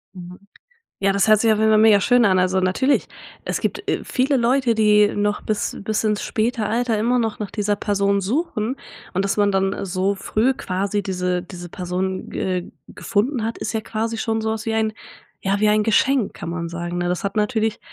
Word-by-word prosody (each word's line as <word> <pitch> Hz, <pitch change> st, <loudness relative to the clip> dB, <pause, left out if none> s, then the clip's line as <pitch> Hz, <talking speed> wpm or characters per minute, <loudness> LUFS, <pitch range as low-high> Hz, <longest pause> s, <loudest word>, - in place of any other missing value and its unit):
Mhm. 180 Hz, 0 st, -10 dB, 0.6 s
Ja, 195 Hz, 0 st, +2 dB
das 200 Hz, +2 st, +2 dB
hört 215 Hz, -, +6 dB
sich 225 Hz, -1 st, +4 dB
auf 215 Hz, -, 0 dB
jeden 220 Hz, 0 st, +4 dB
Fall 215 Hz, -, +5 dB
mega 215 Hz, -2 st, +6 dB
schön 245 Hz, +3 st, +4 dB
an. 185 Hz, -2 st, +4 dB
Also 185 Hz, +1 st, +1 dB
natürlich, 225 Hz, +10 st, +1 dB, 0.4 s
es -, -, -2 dB
gibt, -, -, -3 dB
äh, -, -, 0 dB
viele 270 Hz, +2 st, +1 dB
Leute, 245 Hz, 0 st, +2 dB
die 210 Hz, -1 st, +4 dB
noch 205 Hz, 0 st, -1 dB
bis 215 Hz, -1 st, -2 dB
bis 215 Hz, +1 st, -1 dB
ins 210 Hz, -2 st, 0 dB
späte 225 Hz, 0 st, -1 dB
Alter 230 Hz, 0 st, 0 dB
immer 245 Hz, +3 st, +2 dB
noch 225 Hz, -2 st, -2 dB
nach 210 Hz, -2 st, -5 dB
dieser 210 Hz, -1 st, 0 dB
Person 200 Hz, -1 st, +1 dB
suchen 235 Hz, -, -1 dB, 0.4 s
und 190 Hz, +2 st, 0 dB
dass 195 Hz, -, 0 dB
man 205 Hz, -1 st, +2 dB
dann, 195 Hz, 0 st, +1 dB
äh, 200 Hz, -, -5 dB
so 185 Hz, +2 st, 0 dB
früh 230 Hz, +7 st, +1 dB
quasi 200 Hz, +1 st, -2 dB
diese 180 Hz, -1 st, -1 dB
diese 175 Hz, -1 st, -9 dB
Person 185 Hz, +2 st, -3 dB
ge 180 Hz, -1 st, -3 dB, 0.2 s
gefunden 230 Hz, +2 st, -1 dB
hat, 230 Hz, -, -3 dB
ist -, -, -3 dB
ja 220 Hz, -, 0 dB
quasi 225 Hz, +1 st, -3 dB
schon 225 Hz, -1 st, -1 dB
so 220 Hz, 0 st, -1 dB
was 220 Hz, 0 st, -4 dB
wie 220 Hz, -, 0 dB
ein 220 Hz, -1 st, +1 dB, 0.5 s
ja 195 Hz, +1 st, 0 dB
wie 215 Hz, -, +4 dB
ein 210 Hz, 0 st, +3 dB
Geschenk, 245 Hz, +1 st, +2 dB
kann 170 Hz, -, -6 dB
man 170 Hz, -1 st, -4 dB
sagen, 175 Hz, +1 st, -4 dB
ne? 175 Hz, 0 st, -1 dB
Das 180 Hz, -, -2 dB
hat 200 Hz, +1 st, -3 dB
natürlich, 220 Hz, 0 st, 0 dB
210 Hz, 215 wpm, -21 LUFS, 190-225 Hz, 0.6 s, hört